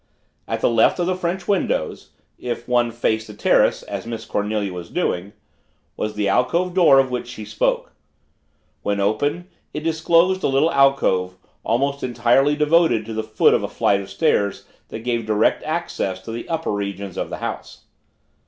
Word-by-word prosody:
At - - -3
the - - +3
left 115 -1 +4
of 175 - 0
the 185 - +1
French 180 0 -3
windows 190 - -1 0.3
(if 120 -1 -5
one 120 -1 +2
faced 110 -1 -1
the 105 - -10
terrace - - +2
as - - -6
Miss 115 -1 -5
Cornelia 105 -2 -2
was 90 -1 -7
doing) 90 +3 -2 0.6
was 105 0 -3
the 105 -1 0
alcove 125 - +1
door 170 -7 +6
of 135 -1 +3
which 125 -1 -3
she 110 -3 -8
spoke. 105 +1 -1 0.9
When 100 0 -1
open, 145 - 0 0.3
it 150 - -3
disclosed 165 +3 +2
a - - +1
little 140 +4 +2
alcove, 115 -10 +2 0.3
almost 140 +4 0
entirely 125 +4 +2
devoted 150 -6 +3
to 115 - -6
the 110 - -1
foot 110 0 +3
of - - +2
a - - -2
flight 100 -1 +1
of 95 - -10
stairs 100 0 0 0.2
that 110 - -7
gave 120 -2 -2
direct 110 0 +2
access 155 - -2
to 115 - -7
the 115 +1 -6
upper 165 -1 -2
regions 100 -2 -4
of - - -3
the - - -5
house. - - -6
120 Hz, 175 wpm, -21 LUFS, 105-150 Hz, 0.9 s, door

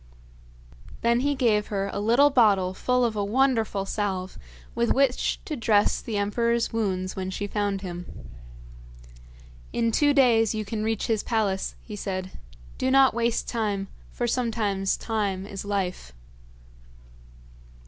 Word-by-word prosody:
Then 235 +1 +3
he 285 +2 0
gave 220 -5 +2
her 200 -1 -2
a - - -2
little 240 +8 +4
bottle 200 -7 +3
full 250 +5 +1
of 225 -2 -1
a 205 - 0
wonderful 225 -3 +1
salve 190 -3 -3 0.3
with 235 0 +1
which 270 -2 +1
to 310 - -3
dress 220 -5 +2
the 220 -3 -4
emperor's 235 +4 0
wounds 190 -4 -1
when 190 -1 -3
she 195 +2 -3
found 205 -1 -2
him. 180 -2 -6 1.6
'In 230 -1 0
two 290 +5 +3
days 235 -6 +4
you 215 -1 -3
can 215 +1 -3
reach 220 -1 -1
his 220 -3 0
palace,' 205 -5 -1
he 210 - -8
said. 185 -2 -4 0.5
'Do 260 - +1
not 270 0 +5
waste 235 0 0
time, 205 -4 -2 0.2
for 240 - -2
sometimes 220 -5 0
time 200 -4 -2
is 200 -1 -7
life.' 185 - -3
215 Hz, 140 wpm, -25 LUFS, 195-235 Hz, 1.6 s, not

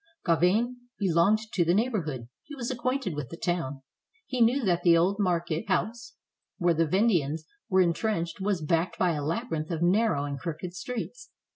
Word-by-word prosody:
Gauvain 225 +9 +1
belonged 190 +2 +3 0.2
to 180 - +3
the 170 +2 +2
neighborhood; 175 - -1
he 295 - -10
was 245 -2 -3
ac 250 - -5
quainted 255 - -1
with 145 -4 -5
the 165 - -8
town; 150 -7 -2 0.4
he 255 -2 -2
knew 240 +2 +3
that 175 -2 +2
the 170 -1 +5
old 185 +4 +2
market 175 -4 0
house 220 +6 -1 0.4
where 175 -3 +3
the 165 0 +1
Vendeans 165 -5 +1 0.3
were 190 -2 +4
intrenched 170 0 0
was 190 -4 0
backed 165 +3 0
by 180 -2 +2
a 150 -3 -2
labyrinth 160 - -2
of 170 -1 -1
narrow 185 -5 +2
and 140 -1 -4
crooked 165 +4 -5
streets. 250 - -6
180 Hz, 175 wpm, -28 LUFS, 165-220 Hz, 0.4 s, the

